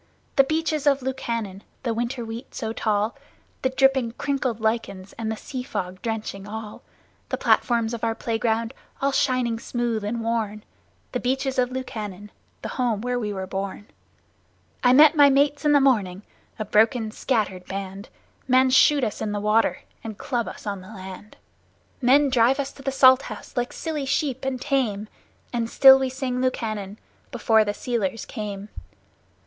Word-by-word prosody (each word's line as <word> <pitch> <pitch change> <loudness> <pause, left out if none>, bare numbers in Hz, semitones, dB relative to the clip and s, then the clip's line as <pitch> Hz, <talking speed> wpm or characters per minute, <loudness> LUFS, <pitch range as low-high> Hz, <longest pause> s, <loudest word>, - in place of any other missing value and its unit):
The 275 - +7
Beaches 310 0 -1
of 275 -2 +3
Lukannon 230 -7 -3 0.2
the 235 -3 0
winter 240 +1 -3
wheat 225 +3 -8
so 225 -3 -3
tall 215 0 0 0.5
The 260 - +1
dripping, 265 -3 +2
crinkled 260 -4 -2
lichens, 220 -4 -2
and 225 -1 -4
the 220 - -4
sea 255 +2 -6
fog 185 -6 -5
drenching 215 -3 -4
all! 215 0 -7 0.5
The - - -1
platforms 235 -1 +2
of 235 - -5
our 225 -1 0
playground, 230 +1 -1 0.3
all 275 +1 +1
shining 255 -4 +1
smooth 235 -2 -2
and 225 +2 -3
worn! 220 -2 -2 0.5
The 250 - -2
Beaches 265 +1 -1
of 250 -1 +2
Lukannon 210 -6 -6 0.3
the - - -4
home 235 -5 +1
where 245 +1 -1
we 210 -3 -3
were 190 -2 -4
born! 195 +2 -5 0.9
I 250 - +6
met 300 +4 +7
my 285 -2 +7
mates 285 +2 +2
in 295 - +5
the 290 - +6
morning, 210 -8 +1 0.3
a 215 - -3
broken, 220 +2 +2
scattered 210 -7 -1
band. 195 +1 -6 0.4
Men 260 0 +4
shoot 285 +1 +5
us 215 -4 -2
in 210 -1 -2
the 205 - -1
water 210 +2 +2 0.2
and 220 -3 -7
club 240 -2 -2
us - - -9
on 200 -2 -3
the 185 - -13
land; 190 0 -10 0.6
Men 275 +3 +4
drive 250 +2 +3
us 275 0 -2
to 275 - -14
the 270 0 -2
Salt 260 0 +6
House - - -9
like 245 -1 -1
silly 300 -4 -4
sheep 275 -2 -1
and 265 -1 -2
tame, 240 -7 -1 0.4
And 230 -1 -1
still 265 +1 +8
we 265 -1 0
sing 255 -1 -3
Lukannon 215 -5 -2 0.3
before 225 -2 +3
the 205 -1 -3
sealers 225 -3 -2
came. 205 -3 -6
235 Hz, 170 wpm, -24 LUFS, 210-265 Hz, 0.9 s, still